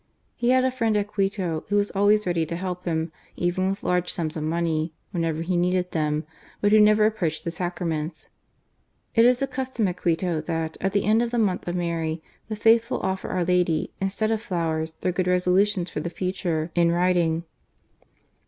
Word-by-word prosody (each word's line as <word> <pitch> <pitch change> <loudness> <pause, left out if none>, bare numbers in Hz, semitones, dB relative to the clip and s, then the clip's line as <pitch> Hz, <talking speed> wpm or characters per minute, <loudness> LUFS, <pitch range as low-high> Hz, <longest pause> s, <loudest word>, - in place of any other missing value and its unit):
He 240 0 0
had 255 0 +4
a 260 - +2
friend 230 -4 +1
at 205 0 -1
Quito, 195 -5 -1
who 205 - +1
was 205 0 +2
always 205 +1 +3
ready 175 -2 +1
to 170 - -3
help 180 0 -4
him, 160 -1 -1 0.2
even 180 +2 0
with 195 - -4
large 180 0 +1
sums 160 -1 -2
of 155 - -3
money, 160 0 -1 0.2
whenever 165 -3 -1
he 180 +2 -1
needed 180 +1 +1
them, 150 -1 -1 0.3
but 205 - +2
who 215 - +7
never 210 0 +6
approached 180 -8 -1
the 170 - -3
Sacraments. 170 -3 -3 0.9
It 230 0 +5
is 250 +1 +4
the - - +3
custom 260 -4 -2
at 180 -1 -3
Quito 170 -1 0
that, 160 0 -3
at 195 +1 0
the 200 - +1
end 220 +2 +4
of 240 - 0
the 240 - -2
Month 195 -6 0
of 175 - -2
Mary, 165 -2 -2 0.3
the 215 - -2
faithful 225 +2 +3
offer 190 0 -2
our 180 -2 0
Lady, 180 -3 +1
instead 200 +3 0
of 220 -1 0
flowers, 160 -5 -2
their 180 - +1
good 180 0 -1
resolutions 180 0 +2
for - - -3
the 165 +3 -3
future, 175 -3 -2
in 170 -1 +3
writing. 170 -2 +2
180 Hz, 195 wpm, -25 LUFS, 165-205 Hz, 0.9 s, who